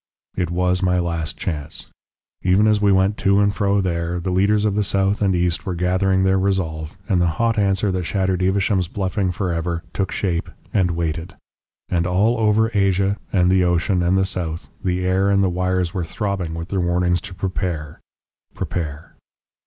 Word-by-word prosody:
"It 90 -3 -1
was 90 +1 +1
my 90 -1 +2
last 85 -2 -2
chance. 75 -3 -3 0.6
Even 95 +4 +3
as 105 -1 +3
we 100 -1 +4
went 95 +2 +2
to 100 0 +3
and 100 0 +3
fro 100 0 +1
there, 85 -1 -2
the 90 +2 -3
leaders 100 +3 +2
of 105 - +1
the 105 +1 +1
south 100 +1 0
and 95 -2 +2
east 90 -1 0
were 95 - -3
gathering 95 +2 +1
their 95 0 +3
resolve, 90 -4 -2
and 95 -5 +2
the 85 - +3
hot 115 -1 +1
answer 100 0 +2
that 90 -1 -2
shattered 95 -1 0
Evesham's 95 0 +1
bluffing 95 0 -1
for 90 0 -2
ever, 85 0 -2
took 95 - -1
shape 85 -4 -1 0.2
and 95 -3 +2
waited. 85 0 -3 0.5
And 85 -1 0
all 105 +6 +2
over 110 +1 +3
Asia, 100 0 +2
and 90 -2 +3
the 95 -1 +4
ocean, 90 +1 +1
and 90 +2 +2
the 95 - +2
south, 85 -3 -4
the 90 0 0
air 95 +2 +2
and 100 0 +3
the 95 - +2
wires 90 0 -1
were 95 -3 -2
throbbing 95 -2 -3
with 85 +2 -6
their 95 -2 0
warnings 90 0 +1
to 95 0 -9
prepare 90 -5 -3 0.6
prepare. 75 -3 -4
95 Hz, 185 wpm, -21 LUFS, 85-100 Hz, 0.6 s, we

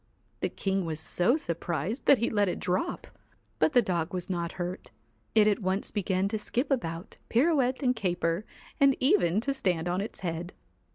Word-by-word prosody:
The - - 0
king 195 -1 -1
was 160 -2 -3
so 180 - +2
surprised 170 - -3
that 280 - +8
he 235 - 0
let 205 -3 +2
it - - -3
drop. 305 - -1 0.5
But 305 - +3
the 245 -2 +5
dog 170 -2 -1
was 180 +1 -3
not 170 -2 -2
hurt 180 +1 -5 0.5
It 215 -1 +6
at 210 - +2
once 190 +1 -1
began 190 -2 0
to 220 +1 -2
skip 250 +7 -2
about, 170 -7 -2
pirouette 265 0 +2
and 250 -1 +3
caper, 175 -3 0 0.4
and 275 -1 +5
even 185 -7 +3
to 275 +3 -1
stand 180 -10 0
on 180 +2 0
its 210 - -7
head. 175 0 -4
190 Hz, 180 wpm, -29 LUFS, 175-245 Hz, 0.5 s, that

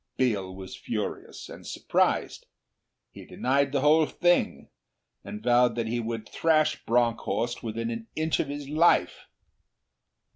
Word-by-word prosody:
Biel 100 -8 0
was 95 0 -9
furious 105 +2 -5
and - - -11
surprised. - - 0 0.6
He - - -11
denied 135 +1 0
the 140 -1 0
whole 155 +2 +4
thing, 175 0 +1 0.5
and 210 +1 -8
vowed 120 -1 +4
that 115 -1 -1
he 120 +2 -2
would 115 -1 -4
thrash 155 -2 +1
Bronckhorst 120 0 0
within 115 +1 -3
an 115 -1 -6
inch 155 0 0
of - - 0
his 145 0 -6
life. 155 - +2
120 Hz, 135 wpm, -27 LUFS, 115-150 Hz, 0.6 s, whole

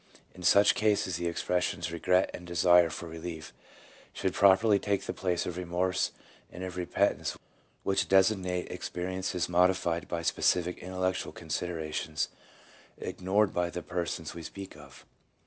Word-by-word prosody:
In 90 - -12
such 100 +3 +6
cases 105 -5 +1
the 85 0 -2
expressions 85 0 -1
'regret' 90 +3 +2
and 90 - -8
'desire 85 0 +5
for 85 +2 -6
relief 80 -1 -7 0.6
should - - -1
properly 100 +2 +5
take 100 -1 -1
the - - -3
place 90 -2 -1
of 90 -1 -4
'remorse' 90 +1 0 0.4
and 90 - -7
of 95 -1 -5
'repentance,' 90 +3 0 0.5
which 95 0 +1
designate 95 -2 +2
experiences 90 0 -3
modified 90 -1 +2
by 85 -1 -3
specific 90 +1 +1
intellectual 95 +1 -2
considera 80 -1 -4
tions 75 -2 -2 0.7
ignored 95 +3 0
by 90 0 0
the 90 0 -6
persons 85 -2 -3
we 85 - -8
speak 95 +4 -8
of. 70 -2 -14
90 Hz, 140 wpm, -30 LUFS, 85-95 Hz, 0.7 s, such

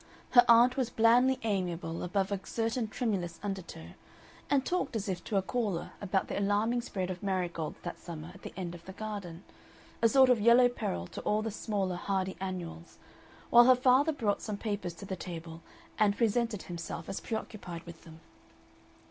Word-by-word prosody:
Her 245 -1 +8
aunt 235 +2 +6
was 255 -3 0
blandly 245 +3 +4
amiable 175 -6 -2
above 195 +2 -1
a 200 - -1
certain 225 +2 -1
tremulous 195 -8 -2
undertow, 190 - -6 0.6
and 275 -2 +2
talked 360 -8 -1
as 215 -1 -2
if 180 -2 -3
to 210 - 0
a 195 - +2
caller 205 -5 -2
about 195 -1 0
the - - -2
alarming 210 +4 +1
spread 190 -6 -3
of 180 - -7
marigolds 180 -5 -2
that - - -6
summer 165 -1 -8
at 190 - -15
the - - -8
end 175 -2 -4
of 170 -1 -11
the 190 - -8
garden, 200 -5 -6 0.6
a 230 - +5
sort 260 +2 +6
of 235 -4 +3
Yellow 240 +3 +6
Peril 85 - -3
to - - -8
all 215 +1 0
the 225 - -2
smaller 200 -4 -2
hardy 190 0 -1
annuals, 170 -3 -6 0.5
while 240 0 +9
her 255 0 +7
father 260 +5 +4
brought 220 -9 -1
some 210 -2 -4
papers 200 -5 -3
to 185 - -9
table 165 -2 -8 0.4
and 205 -1 +3
presented 230 -2 +1
himself 170 -1 -6
as - - -4
preoccupied 200 -6 -6
with 170 -1 -11
them. 160 0 -14
200 Hz, 180 wpm, -31 LUFS, 175-230 Hz, 0.6 s, while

